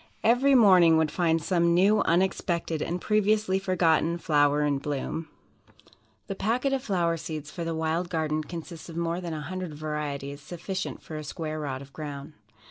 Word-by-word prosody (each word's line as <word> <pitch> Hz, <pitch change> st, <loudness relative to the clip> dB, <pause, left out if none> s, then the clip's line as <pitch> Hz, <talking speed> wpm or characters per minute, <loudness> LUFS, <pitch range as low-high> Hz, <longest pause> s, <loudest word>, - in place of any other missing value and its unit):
Every 255 Hz, +5 st, +4 dB
morning 185 Hz, -8 st, +7 dB
would 160 Hz, -1 st, +1 dB
find 165 Hz, -1 st, +2 dB
some 170 Hz, +1 st, +2 dB
new, 200 Hz, +4 st, +4 dB
unexpected, 170 Hz, -2 st, 0 dB
and 175 Hz, +2 st, -2 dB
previously 210 Hz, -1 st, +2 dB
forgotten 170 Hz, -3 st, +2 dB
flower 150 Hz, -3 st, +2 dB
in 145 Hz, -2 st, +1 dB
bloom." 150 Hz, +3 st, -4 dB, 1.0 s
The 195 Hz, -, -4 dB
packet 240 Hz, +8 st, 0 dB
of 270 Hz, -, 0 dB
Flower 175 Hz, -8 st, 0 dB
Seeds 155 Hz, -2 st, -6 dB
for 170 Hz, -, -5 dB
the 165 Hz, 0 st, -2 dB
"Wild 160 Hz, +2 st, -1 dB
Garden" 155 Hz, -2 st, -1 dB
consists 165 Hz, +1 st, -8 dB
of 165 Hz, -, -8 dB
more 170 Hz, +1 st, -1 dB
than 170 Hz, -3 st, -4 dB
a 155 Hz, -, -5 dB
hundred 180 Hz, +1 st, -5 dB
varieties, 145 Hz, -2 st, -4 dB
sufficient 180 Hz, +5 st, -5 dB
for 155 Hz, -, -7 dB
a 155 Hz, -, -5 dB
square 155 Hz, +1 st, -5 dB
rod 135 Hz, -3 st, -4 dB
of 140 Hz, -, -17 dB
ground. 145 Hz, -1 st, -7 dB
165 Hz, 170 wpm, -27 LUFS, 155-185 Hz, 1.0 s, morning